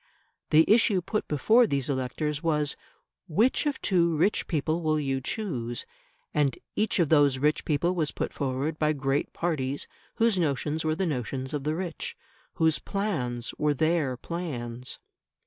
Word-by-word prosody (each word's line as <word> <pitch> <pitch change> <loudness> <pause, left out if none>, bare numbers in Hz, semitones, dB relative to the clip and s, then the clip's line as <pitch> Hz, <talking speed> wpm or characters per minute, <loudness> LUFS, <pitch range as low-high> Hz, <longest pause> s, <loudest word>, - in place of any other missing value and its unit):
The 160 +1 +6
issue 215 -3 +4
put 215 +4 -2
before 220 - +4
these 140 -6 -1
electors 140 +3 -2
was, 150 -3 +1 0.5
Which 220 - +2
of 290 - -1
two 170 -4 +2
rich 195 +7 +2
people 160 +1 0
will 155 -1 +1
you 135 -2 -1
choose? 125 - -3 0.5
And 140 -4 +1 0.2
each 215 0 +1
of 170 -6 +2
those 145 -4 +5
rich 150 +3 +1
people 170 +4 +1
was 160 -5 0
put - - -3
forward 140 +3 -2
by 155 0 +2
great 135 0 -1
parties 145 -5 -2 0.3
whose 225 -4 +2
notions 150 0 0
were 155 0 +1
the 190 +3 0
notions 130 -2 -3
of 145 -2 -3
the 155 +1 0
rich 175 -2 -5 0.4
whose 160 -2 +3
plans 130 - -2
were 150 -1 +2
their 155 -4 +1
plans. 125 -7 -5
150 Hz, 155 wpm, -27 LUFS, 135-170 Hz, 0.5 s, The